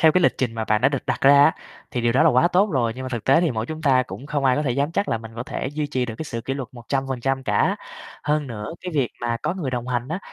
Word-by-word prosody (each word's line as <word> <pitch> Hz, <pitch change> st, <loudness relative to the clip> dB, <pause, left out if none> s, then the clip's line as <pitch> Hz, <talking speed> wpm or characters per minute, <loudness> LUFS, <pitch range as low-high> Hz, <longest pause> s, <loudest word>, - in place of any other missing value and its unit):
theo 160 Hz, -1 st, +6 dB
cái 185 Hz, -, +3 dB
lịch -, -, +4 dB
trình 120 Hz, -3 st, -1 dB
mà 110 Hz, -1 st, -2 dB
bạn 110 Hz, 0 st, +2 dB
đã 130 Hz, -, +5 dB
được 135 Hz, -2 st, -4 dB
đặt -, -, -1 dB
ra 140 Hz, +1 st, +7 dB
á, 160 Hz, -, +5 dB, 0.4 s
thì 125 Hz, -, -2 dB
điều 120 Hz, 0 st, +2 dB
đó 130 Hz, -, +4 dB
là 165 Hz, -, +6 dB
quá 130 Hz, +7 st, +4 dB
tốt 195 Hz, +4 st, +3 dB
rồi, 120 Hz, -7 st, +1 dB
nhưng 130 Hz, -, -7 dB
mà -, -, -4 dB
thực 120 Hz, -4 st, -4 dB
tế 135 Hz, +5 st, +5 dB
thì 170 Hz, -4 st, +2 dB
mỗi 110 Hz, -1 st, -2 dB
chúng 155 Hz, +2 st, -6 dB
ta 130 Hz, -4 st, +4 dB
cũng 130 Hz, +2 st, -9 dB
không 145 Hz, -2 st, -1 dB
ai 130 Hz, -1 st, +4 dB
có 150 Hz, -, +1 dB
thể 140 Hz, -, 0 dB
dám 140 Hz, +5 st, 0 dB
chắc 200 Hz, +3 st, 0 dB
là 115 Hz, -, 0 dB
mình 115 Hz, 0 st, -10 dB
có 120 Hz, -, -3 dB
thể -, -, -4 dB
duy 150 Hz, 0 st, -2 dB
trì 130 Hz, -3 st, -1 dB
được 115 Hz, -, -5 dB
cái -, -, -4 dB
sự 115 Hz, -6 st, -5 dB
kỉ 135 Hz, +3 st, -3 dB
luật 135 Hz, -3 st, -5 dB
100% 135 Hz, +1 st, -2 dB
cả. -, -, +1 dB, 0.5 s
Hơn 150 Hz, 0 st, 0 dB
nữa 105 Hz, -4 st, -6 dB
cái 180 Hz, -2 st, -6 dB
việc 135 Hz, -5 st, +2 dB
mà 120 Hz, -1 st, -1 dB
có 180 Hz, -, -1 dB
người 165 Hz, -9 st, -3 dB
đồng 125 Hz, -1 st, -3 dB
hành 125 Hz, +1 st, -1 dB
á, 165 Hz, -, -2 dB
135 Hz, 325 wpm, -23 LUFS, 120-150 Hz, 0.5 s, ra